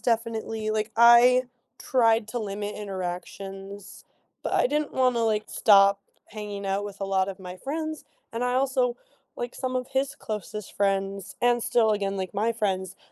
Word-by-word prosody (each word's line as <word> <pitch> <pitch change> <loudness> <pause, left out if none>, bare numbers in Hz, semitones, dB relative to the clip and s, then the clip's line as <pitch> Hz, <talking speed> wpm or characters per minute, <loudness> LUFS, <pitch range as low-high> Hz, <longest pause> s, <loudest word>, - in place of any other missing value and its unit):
definitely 225 -2 -1
like, 215 0 -1
I 240 +2 +7 0.3
tried 225 -4 +2
to 240 - -3
limit 205 -1 -4
interactions, 195 +1 -7 0.4
but - - -3
I - - +4
didn't 295 +3 -1
wanna, 250 -3 +2
like, 215 -1 0
stop 200 -2 +5 0.3
hanging 205 -2 -7
out 195 +1 -1
with 205 -1 -8
a - - -1
lot 195 -1 +1
of 195 0 -6
my 180 -1 -8
friends, 310 - -4 0.3
and 230 +1 -3
I 250 0 0
also, 255 -2 +1 0.4
like, 240 0 -5
some 255 -1 -2
of 250 0 -3
his 270 0 -1
closest 210 -1 -6
friends 195 -1 -1
and 240 -1 +3
still 225 -2 +3
again, 200 -2 -1
like, 190 -1 -4
my 215 +4 +1
friends, 190 -4 -2
215 Hz, 165 wpm, -26 LUFS, 195-240 Hz, 0.4 s, I